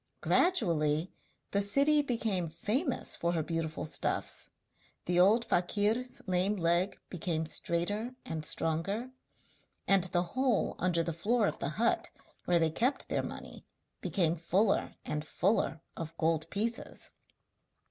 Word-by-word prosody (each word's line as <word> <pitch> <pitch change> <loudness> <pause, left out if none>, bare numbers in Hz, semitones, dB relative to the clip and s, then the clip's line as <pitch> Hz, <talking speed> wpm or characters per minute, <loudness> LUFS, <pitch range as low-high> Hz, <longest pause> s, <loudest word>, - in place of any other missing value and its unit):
Gradually 170 - +2 0.4
the 200 - +2
city 280 +9 +4
became 220 - -1
famous 230 - 0
for 170 0 -1
her 165 -2 0
beautiful 165 -1 -3
stuffs, 155 - -1 0.6
the 175 0 +2
old 215 +6 +5
fakir's 210 +8 0
lame 185 +2 +1
leg 175 +1 +1
became 165 -2 -2
straighter 205 +10 -1
and 160 -1 -4
stronger, 165 +10 -1 0.8
and 195 -2 +5
the 180 -1 +1
hole 255 -5 +1
under 175 -2 +1
the 170 - -3
floor 215 +7 +1
of - - -2
the 140 - -1
hut 230 0 +2 0.4
where 175 - +3
they 165 -1 +2
kept 250 - 0
their - - +1
money - - -8 0.4
became 170 -4 +1
fuller 185 +5 +1
and 150 0 -2
fuller 175 0 0
of 165 0 -6
gold 160 -1 0
pieces. 225 +3 -3
180 Hz, 130 wpm, -31 LUFS, 165-225 Hz, 0.8 s, old